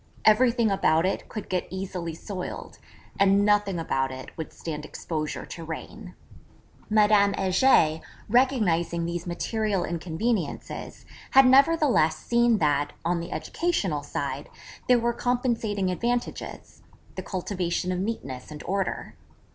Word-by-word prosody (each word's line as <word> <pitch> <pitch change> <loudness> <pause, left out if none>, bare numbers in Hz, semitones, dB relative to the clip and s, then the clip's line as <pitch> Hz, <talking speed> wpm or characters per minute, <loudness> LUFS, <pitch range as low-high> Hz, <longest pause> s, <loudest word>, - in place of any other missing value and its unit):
Everything 230 0 +4
about 165 -3 +3
it 190 - -2
could 215 - -6
get 185 -1 -2
easily 185 -3 -5
soiled; 185 +2 -7 0.4
and 200 +1 +4
nothing 205 -3 +2
about 135 -5 -1
it 130 0 -9
would 160 - -6
stand 150 -2 -6
exposure 155 0 -4
to 165 - -8
rain. 180 +5 -8 0.7
Madame 210 -1 +4
Heger, 185 -5 +3 0.3
recognising 200 -9 +2
these 170 +1 -4
material 205 +2 -1
inconveniences, 175 +2 -3 0.2
had 270 0 +7
nevertheless 270 - +4
seen 235 +5 +2
that, 145 -4 +1
on 175 0 +1
the 170 - -6
educational 200 - -1
side, 140 -1 -4 0.4
there 250 - +6
were 235 0 0
compensating 230 -6 0
advantages 240 +6 -3 0.3
the - - -5
cultivation 180 -1 -2
of 180 - -1
neatness 140 - -4
and 150 -1 -9
order. 195 0 -2
190 Hz, 125 wpm, -26 LUFS, 165-225 Hz, 0.7 s, had